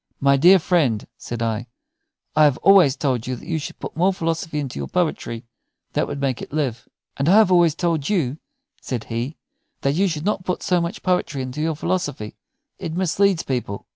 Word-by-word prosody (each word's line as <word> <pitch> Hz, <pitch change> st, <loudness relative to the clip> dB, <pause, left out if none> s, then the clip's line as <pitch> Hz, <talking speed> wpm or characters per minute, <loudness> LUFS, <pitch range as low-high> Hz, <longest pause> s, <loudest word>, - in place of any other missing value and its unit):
"My 140 Hz, 0 st, +4 dB
dear 175 Hz, +8 st, +7 dB
friend," 155 Hz, -, +1 dB
said 120 Hz, -1 st, -5 dB
I, 115 Hz, +1 st, -2 dB, 0.7 s
"I 155 Hz, 0 st, +6 dB
have 145 Hz, -4 st, +3 dB
always 185 Hz, -9 st, +6 dB
told 125 Hz, -6 st, -1 dB
you 130 Hz, -, -2 dB
that -, -, -12 dB
you 160 Hz, -2 st, -1 dB
should 150 Hz, -, -7 dB
put -, -, -7 dB
more 180 Hz, +4 st, +3 dB
philosophy 165 Hz, -3 st, -2 dB
into 135 Hz, -, -4 dB
your 70 Hz, -, -4 dB
poetry. 115 Hz, -, -2 dB, 0.5 s
That -, -, 0 dB
would 145 Hz, -, -5 dB
make 135 Hz, -3 st, -1 dB
it -, -, -8 dB
live." 140 Hz, -6 st, -2 dB, 0.3 s
"And 140 Hz, +4 st, +1 dB
I -, -, +6 dB
have 215 Hz, -3 st, +6 dB
always 170 Hz, -3 st, +4 dB
told 165 Hz, -5 st, -1 dB
you," 160 Hz, -8 st, 0 dB, 0.4 s
said 120 Hz, -4 st, -4 dB
he, 120 Hz, +6 st, -4 dB, 0.4 s
"that 140 Hz, -, +1 dB
you 190 Hz, +6 st, +2 dB
should 160 Hz, -2 st, -3 dB
not 200 Hz, -3 st, 0 dB
put 180 Hz, 0 st, -3 dB
so 180 Hz, -1 st, +2 dB
much 170 Hz, +5 st, -4 dB
poetry 180 Hz, -7 st, 0 dB
into 130 Hz, +4 st, -5 dB
your 160 Hz, 0 st, 0 dB
philosophy. 145 Hz, -10 st, -3 dB, 0.4 s
It 160 Hz, -, -5 dB
misleads 190 Hz, 0 st, +2 dB
people." 120 Hz, -6 st, -3 dB
150 Hz, 200 wpm, -22 LUFS, 130-175 Hz, 0.7 s, dear